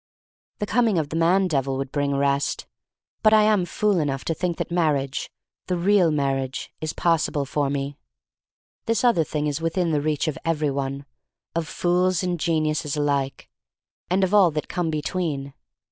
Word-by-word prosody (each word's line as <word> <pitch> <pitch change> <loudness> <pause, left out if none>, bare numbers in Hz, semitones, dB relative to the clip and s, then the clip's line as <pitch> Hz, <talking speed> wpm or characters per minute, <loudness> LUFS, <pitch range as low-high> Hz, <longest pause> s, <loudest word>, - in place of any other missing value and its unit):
The 210 - -2
coming 225 -3 +2
of 155 -3 -1
the 155 - -5
man 180 +4 +3
devil 135 -4 0
would 135 0 -4
bring 145 -1 0
rest. 140 0 0 0.6
But 215 0 +6
I 215 - +6
am 210 -4 +3
fool 205 +1 +1
enough 135 -3 -2
to 165 - 0
think 175 +1 -2
that - - -4
marriage 150 -5 0 0.2
— - - -55
the 180 - 0
real 185 -1 +4
mar 140 -3 +1
riage 135 -1 -4
— - - -46
is 155 -1 -2
possible 165 -4 +1
for 140 +1 -1
me! 140 0 -3 0.9
This 230 0 +1
other 235 -10 +4
thing 150 0 -3
is 150 +1 -2
within 165 +1 0
the 150 -2 +1
reach 150 0 0
of 155 - -2
every 155 -3 0
one— 135 0 -3 0.5
of 165 -1 -2
fools 180 +2 +1
and 180 -2 -1
geniuses 155 -2 0
alike 140 -2 -1 0.3
— - - -55
and 190 +2 +2
of 190 +1 0
all 200 -4 +6
that 150 -1 -4
come 175 -3 -2
between. 150 -3 -2
155 Hz, 190 wpm, -24 LUFS, 140-180 Hz, 0.9 s, But